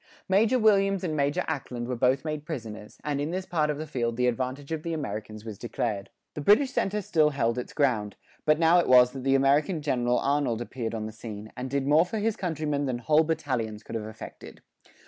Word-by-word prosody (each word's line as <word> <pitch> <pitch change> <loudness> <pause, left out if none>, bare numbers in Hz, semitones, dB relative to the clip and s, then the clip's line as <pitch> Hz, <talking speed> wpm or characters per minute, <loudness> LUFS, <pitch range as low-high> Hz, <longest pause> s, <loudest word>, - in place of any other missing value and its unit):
Major 215 +6 +3
Williams 195 -4 +3
and 160 -4 -1
Major 145 +5 +1
Ackland 125 -6 -4
were 125 - -2
both 130 +4 +2
made 155 -1 -3
prisoners, 110 -9 -7
and 145 -1 -1
in 145 - -2
this 185 +2 -3
part 155 -4 0
of 150 - -1
the 155 - -4
field 120 -6 -2
the 125 - +2
advantage 130 +4 -2
of 160 -1 -2
the 165 +1 -3
Americans 110 -5 -5
was 110 -3 -7
decided. 110 -4 -3 0.2
The 150 - -5
British 235 - +4
centre 205 +1 0
still 155 -4 +3
held 125 -4 0
its 125 - -6
ground; 115 -8 0 0.3
but 155 0 +4
now 165 +2 +5
it - - +1
was 125 -1 +7
that 130 -1 -7
the 135 0 +3
American 145 +5 +3
general 125 -4 +1
Arnold 140 -5 0
appeared 120 -1 -4
upon 110 -1 -3
the 110 - -5
scene, 110 -1 -8
and 130 +1 -5
did 140 0 -1
more 150 +3 +5
for 180 +5 -4
his 215 0 0
countrymen 150 -6 -2
than 125 -2 -1
whole 150 +6 +3
battalions 125 -9 -2
could - - -9
have 110 -2 -3
effected. 110 - -11
140 Hz, 220 wpm, -27 LUFS, 120-160 Hz, 0.3 s, was